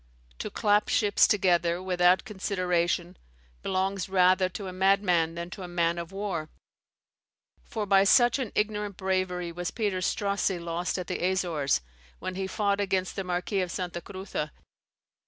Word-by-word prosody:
To - - -3
clap 205 0 +2
ships 205 -2 +4
together, 175 -4 +2
without 180 0 +3
consideration, 180 -4 -1 0.4
belongs 190 0 -1
rather 185 0 +4
to 195 +2 -7
a 185 - -6
madman 185 -3 +2
than 170 +1 -6
to 190 - -8
a 180 - -5
man 170 -1 0
of 170 +1 -6
war; 195 -6 -3 1.1
for 215 -2 -4
by 195 -1 +5
such 240 +6 +5
an 250 -6 -3
ignorant 210 -2 -1
bravery 185 -2 -1
was 175 +1 -4
Peter 205 -5 -1
Strossie 200 0 0
lost 170 +2 -3
at 180 - -3
the - - -4
Azores, 175 - +1 0.4
when 185 - -5
he 190 +1 -3
fought 200 0 0
against 190 -2 -1
the 195 - -2
Marquis 180 +2 -1
of 180 - -2
Santa 175 -1 -4
Cruza. 190 -6 -5
185 Hz, 155 wpm, -28 LUFS, 175-200 Hz, 1.1 s, by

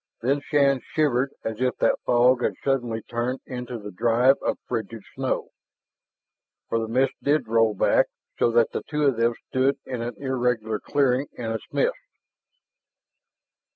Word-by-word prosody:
Then 140 +3 +1
Shann 140 -3 +2
shivered 140 -3 +2
as 110 +1 -4
if 125 0 +1
that - - +2
fog 125 +1 +4
had - - 0
suddenly 120 -5 -1
turned 120 +2 -2
into 125 -1 -5
the 105 -2 -8
drive 120 +7 +3
of - - -1
frigid - - -4
snow. - - -2 1.2
For 115 - +1
the 110 - -2
mist 130 +4 +1
did 145 -4 +1
roll 115 -1 +3
back - - +3 0.3
so - - +4
that 115 -1 +3
the - - -3
two 150 -1 0
of 135 -5 +3
them 115 0 +2
stood 130 +2 +2
in 125 -3 -4
an 120 +1 -4
irregular 125 -5 -1
clearing 140 -1 +1
in 115 -2 -4
its 110 - -5
midst. - - 0
125 Hz, 155 wpm, -25 LUFS, 115-135 Hz, 1.2 s, fog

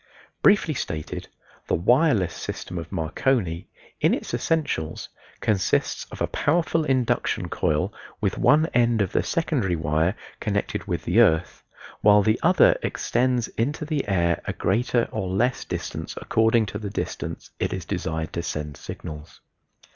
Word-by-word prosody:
Briefly 200 -6 +4
stated, 80 - -4 0.4
the - - +2
wireless 110 - +3
system 90 +2 -5
of 85 - -8
Marconi, 85 - 0 0.3
in - - +3
its - - -7
essentials, 145 - -1 0.3
consists 100 -4 +1
of - - -11
a - - +4
powerful 165 +1 +1
induction 130 -4 0
coil 75 0 0 0.3
with - - 0
one 155 +1 +5
end 120 -3 +3
of 95 - -4
the - - +2
secondary 130 - 0
wire 80 +4 +1 0.2
connected 100 -1 -2
with 85 -4 -2
the 90 +7 +3
earth, 85 -7 +3 0.4
while 105 0 +6
the 110 +3 +2
other 180 +3 +5
extends 125 -1 0
into 145 +7 -2
the 150 -5 -2
air 85 -4 +1
a - - -2
greater 120 0 +1
or 95 - -3
less 120 +7 +1
distance - - -5
according 115 0 +3
to 105 0 -5
the 105 -2 -4
distance - - -5
it - - 0
is - - -4
desired 80 0 -3
to 85 - -2
send 75 -3 -4
signals. 75 -2 -9
105 Hz, 145 wpm, -24 LUFS, 85-125 Hz, 0.4 s, while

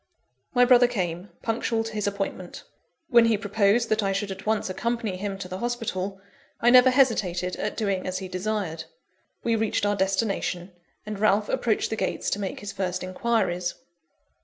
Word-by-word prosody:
My 245 0 +6
brother 245 -1 +6
came, 185 -5 -3
punctual 225 0 0
to 225 0 -6
his 210 -1 -1
appointment. 195 -3 -4 0.5
When 235 -1 +6
he 225 -2 +3
proposed 210 +2 +2
that 215 0 +2
I 195 -1 0
should 200 0 -2
at 195 +2 -8
once 220 -1 +1
accompany 225 +1 -2
him 195 +1 -4
to 195 -1 -6
the 185 +1 -6
hospital, 205 -5 -3 0.4
I 240 - +4
never 255 +1 +8
hesitated 200 -9 +2
at 210 - -3
doing 200 -5 -1
as 185 0 -2
he 190 - -5
desired. 185 -4 -3 0.6
We 230 -1 +2
reached 220 -2 0
our 205 0 +2
destination; 190 -2 -1 0.3
and 210 -1 -5
Ralph 210 0 +3
approached 225 -2 0
the - - 0
gates - - -1
to 205 - -1
make 195 -2 -4
his 205 -1 -5
first 185 -2 -3
enquiries. 185 -2 0
205 Hz, 175 wpm, -26 LUFS, 185-225 Hz, 0.6 s, never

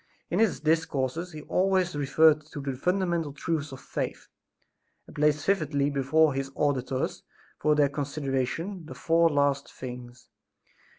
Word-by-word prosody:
In - - +1
his 205 -11 +2
discourses 160 +1 0
he 155 -2 -9
always 185 -2 +1
reverted 150 +2 +4
to 145 - -5
the 135 -1 -3
fundamental 170 0 0
truths 150 0 -2
of 135 - -8
faith - - -5 0.8
and - - -15
placed 150 0 +2
vividly 145 -7 +1
before 145 +2 +3
his 135 0 -3
auditors 135 -2 -1 0.4
for 150 0 +3
their 145 -1 +4
consideration, 145 +5 -3
the - - -8
four 165 0 +3
last 140 -2 +1
things. 125 -1 -9
150 Hz, 135 wpm, -27 LUFS, 135-165 Hz, 0.8 s, reverted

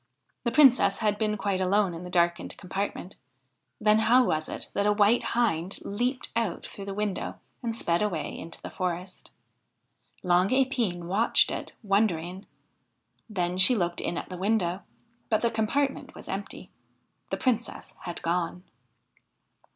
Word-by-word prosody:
The 235 - +2
Princess 255 -7 +5
had 210 -2 0
been 210 -1 0
quite 195 -2 -1
alone 190 0 +2
in 165 +1 -7
the 180 - -7
darkened 175 -1 +1
compartment; 195 0 -4 0.6
then 215 0 +4
how 240 +4 +5
was 155 -9 -1
it - - -4
that 200 +1 +1
a - - +5
white 210 +3 +4 0.2
hind 190 -6 +1
leapt 245 +6 -2
out 225 -6 -1
through 200 - -8
the 200 - -4
window 210 -2 -2 0.3
and 230 -2 -3
sped 170 -3 +2
away 185 -8 -2
into 165 - -8
the - - -6
forest? 180 0 -4 0.9
Long 180 +1 +4
Epine 250 -9 +1
watched 200 +7 +3
it, - - -5
wondering. 195 -3 0 0.8
Then 180 -3 -1
she 245 +7 +7
looked 175 -4 -1
in 170 - -2
at - - -5
the 180 - -6
window, 190 -2 0 0.5
but 215 - +1
the 235 - +2
compartment 265 +6 -1
was - - -10
empty. - - -6 0.6
The - - -2
Princess 235 -3 -2
had 175 -1 -7
gone 175 +1 -1
200 Hz, 150 wpm, -27 LUFS, 180-225 Hz, 0.9 s, she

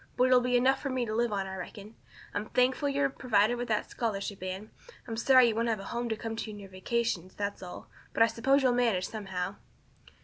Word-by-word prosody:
But 250 - +4
it'll 255 -1 +5
be 250 0 +2
enough 265 +2 +3
for 280 - -2
me 255 -2 0
to 215 - -4
live 235 +1 +1
on 195 -2 -1
I 190 0 -6
reckon. 205 +3 -8 0.4
I'm 205 +1 -3
thankful 255 +3 +2
you're 280 0 +2
provided 240 -4 +2
for - - -3
with 245 - -3
that 215 -2 0
scholarship, 200 -4 -3
Anne. 185 +3 -5 0.4
I'm 225 - -4
sorry 255 +1 +6
you - - 0
won't 230 +1 0
have 225 -2 0
a - - -7
home 240 0 -2
to 220 - 0
come 225 +1 -5
to 225 - -4
in 210 - -7
your 200 -1 -10
vacations, 185 -2 -2
that's 200 0 -3
all, 180 -1 -9 0.2
but - - +4
I - - +8
suppose 265 +5 +2
you'll 255 - +4
manage 230 -7 +2
somehow." 195 -3 -4
225 Hz, 240 wpm, -30 LUFS, 200-245 Hz, 0.4 s, I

